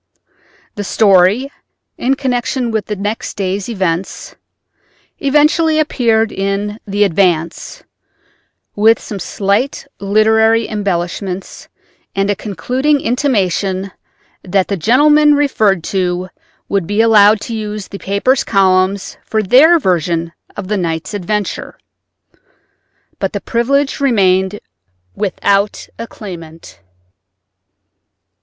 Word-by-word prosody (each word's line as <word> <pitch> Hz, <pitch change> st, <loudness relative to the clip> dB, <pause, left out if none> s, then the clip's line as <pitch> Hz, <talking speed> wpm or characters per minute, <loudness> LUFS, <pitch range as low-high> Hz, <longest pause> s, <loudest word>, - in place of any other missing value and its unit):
The 205 Hz, -, -5 dB
story 200 Hz, +6 st, +3 dB, 0.4 s
(in 265 Hz, +2 st, 0 dB
connection 250 Hz, -2 st, -2 dB
with 220 Hz, -2 st, -2 dB
the 210 Hz, -, -3 dB
next 205 Hz, +3 st, -4 dB
day's 195 Hz, +1 st, -2 dB
events) 185 Hz, -4 st, -3 dB, 0.9 s
eventually 300 Hz, +3 st, +2 dB
appeared 230 Hz, -8 st, +1 dB
in 200 Hz, +2 st, -3 dB
the 205 Hz, +1 st, +1 dB
Advance, 170 Hz, -3 st, 0 dB, 0.9 s
with 220 Hz, +2 st, +4 dB
some 205 Hz, -, -7 dB
slight 200 Hz, +8 st, -1 dB
literary 220 Hz, +3 st, +3 dB
embellishments 190 Hz, -2 st, -4 dB, 0.5 s
and 195 Hz, +1 st, +1 dB
a -, -, 0 dB
concluding 250 Hz, -, -1 dB
intimation 195 Hz, -, -1 dB, 0.5 s
that 190 Hz, 0 st, 0 dB
the 200 Hz, -, 0 dB
gentlemen 295 Hz, -, +4 dB
referred 215 Hz, -, +1 dB
to 180 Hz, -1 st, -1 dB, 0.4 s
would 195 Hz, -4 st, -1 dB
be 205 Hz, +1 st, -1 dB
allowed 215 Hz, -2 st, +5 dB
the 230 Hz, -, -6 dB
use 210 Hz, -2 st, -4 dB
of -, -, -22 dB
the 200 Hz, -, -7 dB
paper's 200 Hz, +7 st, +1 dB
columns 190 Hz, -1 st, +1 dB
for 220 Hz, -1 st, -1 dB
their 285 Hz, -, +6 dB
version 170 Hz, -, -1 dB, 0.3 s
of 200 Hz, -, -5 dB
the 210 Hz, +1 st, -1 dB
night's 170 Hz, +1 st, -3 dB
adventure. 205 Hz, +1 st, -3 dB, 1.4 s
But -, -, -2 dB
the -, -, -2 dB
privilege 275 Hz, +5 st, 0 dB
remained 195 Hz, -6 st, +1 dB, 0.5 s
without 200 Hz, +1 st, 0 dB
a 230 Hz, -, -5 dB
claimant. 165 Hz, -7 st, -11 dB
205 Hz, 110 wpm, -15 LUFS, 190-230 Hz, 1.4 s, their